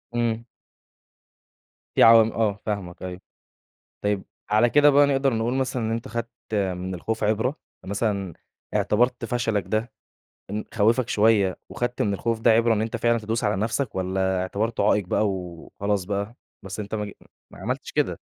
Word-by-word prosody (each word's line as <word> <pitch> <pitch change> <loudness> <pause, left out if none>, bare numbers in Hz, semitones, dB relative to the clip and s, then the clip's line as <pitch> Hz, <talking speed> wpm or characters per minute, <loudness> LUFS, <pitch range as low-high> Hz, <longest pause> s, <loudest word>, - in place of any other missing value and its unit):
إمم. 115 -1 0 1.5
في - - +6
عوامل 115 -1 +7
آه، 105 -2 0
فاهمك 100 -5 -4
أيوه، 90 0 -6 0.8
طيب 105 -2 0 0.3
على 110 +3 +4
كده 145 0 +6
بقى 145 +1 +6
نقدَر 135 -2 +2
نقول 115 +3 0
مثلًا 130 -2 -1
إن 110 - -1
أنت 115 0 -3
خَدت 115 0 -3 0.2
من 95 -2 -1
الخوف 110 +5 -3
عبرة؟ 110 +7 +1 0.3
مثلًا 100 -2 -1 0.4
إعتبَرت 120 +2 +2
فشلَك 115 -4 0
ده 110 +2 -1 0.6
إن 105 +1 -3
خَوّفك 115 +3 +2
شوية 105 -3 +3
وخدْت 120 0 -2
من 100 -1 +1
الخوف 115 +3 -1
ده 115 - +5
عِبرة، 115 +1 +4
إن 110 - 0
أنت 115 +1 -2
فعلًا 120 +1 +2
تدوس 110 +2 -2
على 105 - +2
نفْسك 115 +4 -1
والّا 95 0 0
اعتبرته 105 +3 0
عائق 105 -3 +2
بقى 105 +1 +2
وخلاص 95 +2 -3
بقى، 100 +3 -3 0.3
بس 95 +2 -6
أنت 105 +1 -4
مج 105 -1 -3 0.4
ما - - -13
عملتش - - -4
كده. - - 0
110 Hz, 160 wpm, -24 LUFS, 100-115 Hz, 1.5 s, عوامل